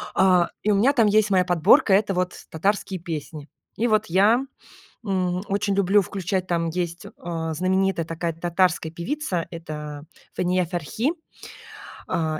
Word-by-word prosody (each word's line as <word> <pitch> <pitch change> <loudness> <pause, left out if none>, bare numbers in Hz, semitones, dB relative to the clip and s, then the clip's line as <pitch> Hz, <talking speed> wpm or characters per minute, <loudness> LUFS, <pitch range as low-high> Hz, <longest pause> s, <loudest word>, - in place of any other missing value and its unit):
а, 185 -2 +4
и 210 - +2
у - - +3
меня 255 +8 +4
там 230 -5 +4
есть 210 0 +3
моя 185 -2 +3
подборка- 175 +2 +4
это 200 0 +3
вот 180 0 -1 0.2
татарские 195 +2 -1
песни. 155 -3 -7 0.3
И 235 +3 +1
вот 215 -1 +2
я, 205 +9 +3 0.6
м, 185 -2 -1
очень 200 0 0
люблю 200 +1 +3
включать, 185 -1 -3
там 170 -1 0
есть, 170 0 -4
э, - - -10 0.4
знаменитая 185 0 +1
такая 165 0 -3
татарская 175 -1 0
певица- 180 - -3
это 150 -3 -7 0.3
Фания 180 0 +1
Ферхи. 190 - -2 1.0
А, 155 -2 -1
180 Hz, 145 wpm, -23 LUFS, 170-200 Hz, 1.0 s, а